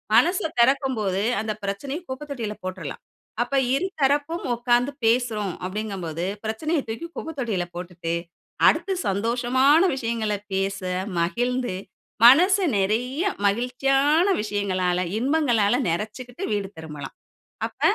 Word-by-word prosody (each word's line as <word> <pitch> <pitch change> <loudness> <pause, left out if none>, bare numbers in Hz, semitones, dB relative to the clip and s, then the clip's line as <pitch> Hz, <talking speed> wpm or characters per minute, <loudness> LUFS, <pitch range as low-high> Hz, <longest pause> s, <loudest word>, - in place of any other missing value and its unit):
மனச 360 +3 +5 0.2
திறக்கும் 265 +1 +3
போது 195 -2 0 0.2
அந்த 215 0 -2
பிரச்சனையை 265 - -3
குப்ப 260 +1 -5
தொட்டியில 230 -7 -3
போட்ருலாம். 185 0 -6 0.4
அப்ப - - -10 0.2
இருதரப்பும் 295 -1 0
உட்கார்ந்து 240 +2 +2
பேசுறோம் 225 -5 +1
அப்படிங்கம்போது 185 -5 -4 0.2
பிரச்சனையை 295 +9 -1
தூக்கி 270 +10 -4
குப்பத்தொட்டியில 240 - -2
போட்டுட்டு, 175 -1 -4 0.5
அடுத்து 390 -1 0
சந்தோஷமான 245 +8 +3 0.2
விஷயங்கள 230 -4 -1 0.2
பேச 195 +1 -1 0.4
மகிழ்ந்து, 245 +5 0 0.5
மனசு 365 +10 +7
நிறைய 235 - 0 0.3
மகிழ்ச்சியான 270 - +2 0.2
விஷயங்களால, 190 -4 0 0.2
இன்பங்களால, 245 -6 +2
நெறச்சுக்கிட்டு 235 - -4
வீடு 205 -2 -1
திரும்பலாம். 150 -3 -8 0.5
அப்ப - - -21
235 Hz, 105 wpm, -24 LUFS, 200-270 Hz, 0.5 s, மனசு